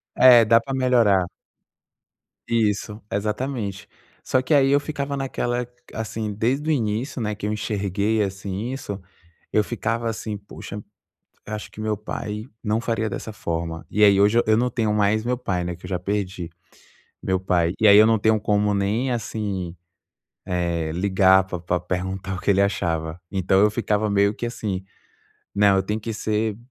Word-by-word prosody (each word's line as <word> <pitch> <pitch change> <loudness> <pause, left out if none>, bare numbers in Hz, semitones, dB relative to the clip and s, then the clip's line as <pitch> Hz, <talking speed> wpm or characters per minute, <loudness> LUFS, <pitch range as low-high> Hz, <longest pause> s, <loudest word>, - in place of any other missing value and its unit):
É, 125 -3 +8
dá 115 +1 +6
para 135 +4 -6
melhorar. 115 -8 +3 1.2
Isso, 105 -1 0
exatamente. 105 -1 -3 0.3
Só 130 - +1
que 130 - 0
aí 135 -2 +5
eu 140 - +5
ficava 140 -1 -4
naquela 125 -2 -2 0.3
assim 110 -1 -4
desde 130 +9 0
o - - +4
início, 120 0 -1
né, 105 -1 -2
que 105 - -6
eu 105 - 0
enxerguei, 105 0 -1
assim, 100 +3 -4
isso 105 -7 -5 0.5
eu 105 - +3
ficava 115 +1 -2
assim, 110 -2 -4
poxa, 100 0 -9 0.7
"Acho 105 0 -6
que 110 - -9
meu 110 -1 -1
pai 105 0 -5 0.2
não 110 0 +1
faria 115 -2 -1
dessa 110 +2 -6
forma". 85 -4 -4
E 105 - +2
aí 100 -1 +6
hoje 105 +4 +5
eu 110 0 +4
não 125 +2 +2
tenho 110 -4 0
mais 105 +1 +2
meu 125 0 0
pai, 100 -8 -2
né, 90 0 -3
que 90 - -13
eu - - -8
já 90 - 0
perdi 95 -2 -3 0.7
meu 95 0 +1
pai, 90 -2 +1
e 110 - +5
aí 100 - +9
eu 110 - +8
não 115 -1 +3
tenho 110 +1 +3
como 105 0 +1
nem 105 +6 0
assim, 100 -6 -3 0.7
eh, 85 -3 -1
ligar 95 +1 +4
pra 95 -1 -5
pra 90 +1 -1
perguntar 95 +2 -3
o - - -6
que - - +1
ele 100 0 +4
achava. 80 -4 -1
Então, 95 0 +2
eu 105 +1 +5
ficava 105 -1 0
meio 100 +1 +3
que 120 - -4
assim, 100 -5 -4 0.7
né, 100 0 +5
eu 95 -1 +3
tenho 105 +3 -3
que 115 +1 -4
ser 110 0 -1
105 Hz, 175 wpm, -23 LUFS, 95-115 Hz, 1.2 s, aí